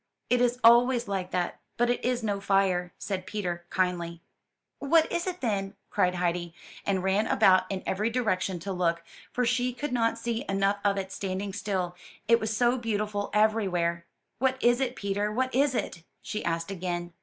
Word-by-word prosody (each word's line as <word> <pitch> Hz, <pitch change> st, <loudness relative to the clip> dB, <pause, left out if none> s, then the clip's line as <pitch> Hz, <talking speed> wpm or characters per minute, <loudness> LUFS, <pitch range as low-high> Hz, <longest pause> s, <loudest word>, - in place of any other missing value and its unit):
'It 245 Hz, 0 st, +4 dB
is 245 Hz, 0 st, +2 dB
always 240 Hz, +1 st, +6 dB
like 190 Hz, -2 st, -2 dB
that, 180 Hz, -1 st, -2 dB, 0.2 s
but 240 Hz, +1 st, +3 dB
it 245 Hz, 0 st, 0 dB
is 250 Hz, -1 st, 0 dB
no 200 Hz, -2 st, -1 dB
fire," 190 Hz, -3 st, +2 dB
said 185 Hz, -2 st, -4 dB
Peter 175 Hz, -4 st, -4 dB
kindly. 175 Hz, -2 st, -1 dB, 0.6 s
"What 315 Hz, +3 st, +3 dB
is 345 Hz, +2 st, -1 dB
it, 365 Hz, -1 st, -4 dB
then?" 200 Hz, -4 st, -1 dB, 0.2 s
cried 180 Hz, 0 st, +2 dB
Heidi, 175 Hz, -1 st, -1 dB, 0.3 s
and 190 Hz, -2 st, +1 dB
ran 195 Hz, +3 st, +2 dB
about 185 Hz, -1 st, +4 dB
in 195 Hz, -1 st, -3 dB
every 210 Hz, +4 st, 0 dB
direction 205 Hz, -6 st, 0 dB
to 195 Hz, +3 st, -4 dB
look; 170 Hz, -2 st, 0 dB, 0.3 s
for 250 Hz, -, 0 dB
she 245 Hz, +1 st, +1 dB
could 270 Hz, +2 st, -4 dB
not 230 Hz, -1 st, +1 dB
see 235 Hz, +1 st, -2 dB
enough 195 Hz, +1 st, +1 dB
of 200 Hz, -1 st, +2 dB
it 190 Hz, -1 st, -3 dB
standing 195 Hz, +1 st, -3 dB
still, 185 Hz, -4 st, -2 dB, 0.3 s
it 230 Hz, +1 st, +5 dB
was 220 Hz, -, -2 dB
so 245 Hz, +2 st, +3 dB
beautiful 210 Hz, -3 st, -2 dB
everywhere. 180 Hz, -6 st, +1 dB, 0.3 s
"What 260 Hz, 0 st, +2 dB
is 240 Hz, +1 st, +3 dB
it, 255 Hz, -1 st, -1 dB
Peter? 205 Hz, +1 st, -1 dB
what 260 Hz, +4 st, -1 dB
is 270 Hz, +1 st, +2 dB
it?" 170 Hz, -, -3 dB, 0.2 s
she 210 Hz, -, -4 dB
asked 165 Hz, +2 st, -2 dB
again. 175 Hz, -2 st, -4 dB
200 Hz, 180 wpm, -28 LUFS, 185-240 Hz, 0.6 s, always